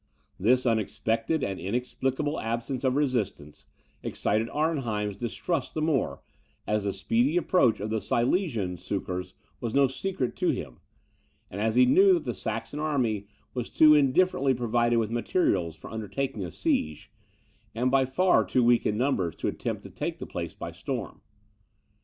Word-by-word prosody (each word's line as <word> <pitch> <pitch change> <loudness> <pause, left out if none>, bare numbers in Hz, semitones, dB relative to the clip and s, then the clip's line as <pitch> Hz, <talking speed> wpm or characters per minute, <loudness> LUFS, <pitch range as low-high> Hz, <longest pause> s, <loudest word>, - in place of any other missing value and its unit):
This 125 +6 +3
unexpected 115 +5 0
and 95 -1 -2
inexplicable 130 - -2
absence 115 +3 -3
of 130 -1 +2
resistance 120 - -2 0.3
excited 110 +2 -1
Arnheim's 120 -10 -1
distrust 125 - -3
the 155 - -1
more, 155 -6 0 0.4
as 105 -1 0
the 100 - +1
speedy 120 - +1
approach 170 - +3
of 105 +2 -4
the 110 -1 0
Silesian 120 - 0
succours 90 0 -4 0.2
was 115 0 -3
no 140 0 +6
secret 135 -1 -3
to - - +1
him, - - -3 0.7
and 100 - -4
as 110 +1 +1
he 125 0 +7
knew 190 +9 +6
that 170 -3 +1
the 120 -4 -3
Saxon 115 +6 -4
army 125 -10 0 0.3
was 125 -2 -3
too 155 -1 +6
indifferently 140 -1 +3
provided 120 0 +1
with 110 -1 0
materials 100 - 0
for - - -11
undertaking 110 +2 -3
a 90 - -4
siege, 75 -1 -1 0.6
and 125 +3 +1
by 135 0 +4
far 130 -1 +3
too 115 +6 +1
weak 120 0 +4
in 105 - 0
numbers 110 - 0
to - - -3
attempt - - -3
to - - -10
take - - -4
the - - -6
place - - -5
by - - -6
storm. - - -5
120 Hz, 160 wpm, -27 LUFS, 105-135 Hz, 0.7 s, he